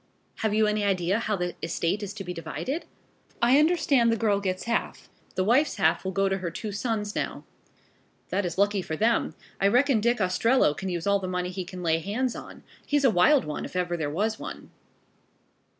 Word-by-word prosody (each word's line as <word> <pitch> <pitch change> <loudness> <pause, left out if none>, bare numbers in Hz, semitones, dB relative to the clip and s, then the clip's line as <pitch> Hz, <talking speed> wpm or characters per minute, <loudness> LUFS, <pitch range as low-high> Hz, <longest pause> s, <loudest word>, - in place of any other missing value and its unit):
"Have 215 -1 0
you 220 0 +4
any 210 0 0
idea 190 0 +1
how 215 -2 -1
the 180 -2 -2
estate 170 +4 -1
is 200 -2 -4
to 205 - -6
be 180 -1 -5
divided?" 255 - -4 0.5
"I 250 +3 +5
understand 295 -7 +3
the 230 - +1
girl 205 -3 +2
gets 185 -2 -2
half. 235 0 -2 0.3
The 185 - +1
wife's 255 +9 +3
half 195 - +2
will 190 - -2
go 195 +1 +1
to 195 0 -1
her 180 -2 -3
two 210 +5 -5
sons 210 -1 -2
now." - - -3 0.9
"That 200 +2 0
is 175 - -4
lucky 200 0 +2
for 160 - -4
them. 225 +7 +1 0.2
I 195 - +4
reckon 250 +3 +3
Dick 240 +2 +2
Ostrello 185 - +3
can 190 +6 -4
use 175 -2 -3
all 200 0 +3
the 185 - -4
money 180 0 -2
he 185 0 -5
can 180 0 -8
lay 165 -1 +2
hands 225 +8 -2
on. - - -10 0.2
He's 290 -1 +1
a 260 - +6
wild 250 +10 +4
one, 150 -1 -4
if - - -8
ever 180 -1 0
there 155 -4 -2
was 215 +8 -1
one." - - -8
200 Hz, 210 wpm, -26 LUFS, 180-230 Hz, 0.9 s, a